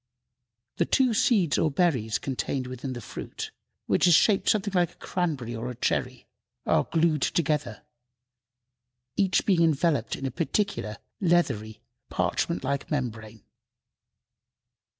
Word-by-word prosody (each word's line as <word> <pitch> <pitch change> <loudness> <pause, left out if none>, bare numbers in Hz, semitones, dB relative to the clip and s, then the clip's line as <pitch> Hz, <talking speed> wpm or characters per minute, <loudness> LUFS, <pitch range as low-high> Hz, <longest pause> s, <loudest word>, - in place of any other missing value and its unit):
The - - +2
two 260 -3 +3
seeds 205 - +3
or 160 - +3
berries 135 - +1
contained 130 +1 -3
within 130 +1 -5
the 120 - -6
fruit, - - -7 0.3
which - - +3
is 175 - +7
shaped 200 +3 +4
something 205 -2 +1
like 175 -2 +2
a - - -27
cranberry 145 -10 -3
or 115 +2 -4
a 125 - -6
cherry, - - -1 0.4
are - - +2
glued 160 -3 +2
together, 150 - 0 1.3
each 195 -2 +2
being 185 -5 +3
enveloped 155 -6 +2
in 135 - -6
a 135 - -2
peculiar, 165 - -1 0.2
leathery, 135 - +1 0.3
parchment 90 - -1
like 140 +1 -2
membrane. 110 -6 -4
145 Hz, 130 wpm, -27 LUFS, 120-175 Hz, 1.3 s, is